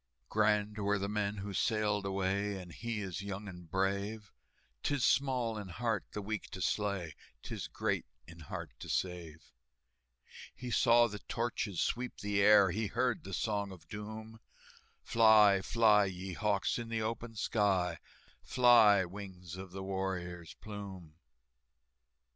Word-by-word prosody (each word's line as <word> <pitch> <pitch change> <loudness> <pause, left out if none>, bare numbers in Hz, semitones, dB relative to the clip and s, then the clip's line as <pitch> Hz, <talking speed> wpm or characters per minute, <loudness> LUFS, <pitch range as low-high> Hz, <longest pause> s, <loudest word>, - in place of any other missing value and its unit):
"Grand 105 0 +2
were 100 0 +1
the 100 0 -2
men 105 0 -1
who 100 0 -5
sailed 105 -1 +1
away, 95 +1 -1
And 90 -2 -10
he 115 +3 -4
is 95 -2 -4
young 100 +1 -5
and 90 -3 -10
brave; 100 +3 -1 0.5
'Tis 145 -4 +1
small 125 -5 +1
in 100 - -7
heart 110 +3 -2
the 105 - -4
weak 110 0 -4
to - - -6
slay, 100 -5 -1 0.3
'Tis - - -5
great - - -2 0.2
in 85 0 -13
heart 80 - -7
to - - -8
save." 85 -4 -3 1.0
He 125 -1 -6
saw 120 -1 +5
the 105 -3 -5
torches 115 -4 -2
sweep 125 +1 -2
the 100 0 0
air, 100 -2 +7
He 110 +4 -1
heard 125 +1 0
the 95 - -8
Song 100 -3 -1
of 85 -4 -13
Doom, 110 +2 -7 0.6
"Fly, 110 -4 +6
fly, 105 -1 +4
ye 95 0 -5
hawks, 100 +3 0
in 115 -1 -6
the 115 -1 -1
open 115 +1 -4
sky, 95 -6 +1 0.4
Fly, 115 -6 +6
wings 90 -2 -9
of 95 0 -8
the 95 +2 -7
warrior's 90 -3 -4
plume!" 100 -6 -9
100 Hz, 145 wpm, -33 LUFS, 95-110 Hz, 1.0 s, air